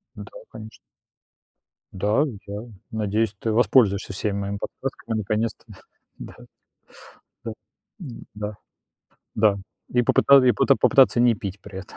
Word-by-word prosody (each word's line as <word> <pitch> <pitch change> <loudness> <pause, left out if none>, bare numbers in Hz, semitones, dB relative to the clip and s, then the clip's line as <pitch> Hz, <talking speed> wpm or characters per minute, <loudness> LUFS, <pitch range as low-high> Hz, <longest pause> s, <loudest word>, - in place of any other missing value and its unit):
Да, - - -10 0.2
конечно. 110 0 -10 1.2
Да, 105 +8 +1 0.2
да. 105 +4 -6 0.2
Надеюсь, 110 -1 -1
ты 115 - -1
воспользуешься 105 -3 +3
всеми 100 +1 -2
моими 100 0 -3
подсказками 115 0 -5
наконец-то, 110 +2 -2 0.5
да. - - -10
Да, - - -14 1.0
да. 115 - -4 0.5
Н-да. 105 -5 -8 0.8
Да, 105 -2 +3 0.3
и 125 - +2
попыта 140 +3 +5
и 125 - +5
поты 135 +5 +3
попытаться 135 -2 +4
не 120 -1 +5
пить 100 -1 -7
при 95 - -10
этом. 95 - -14
110 Hz, 125 wpm, -23 LUFS, 100-120 Hz, 1.2 s, попыта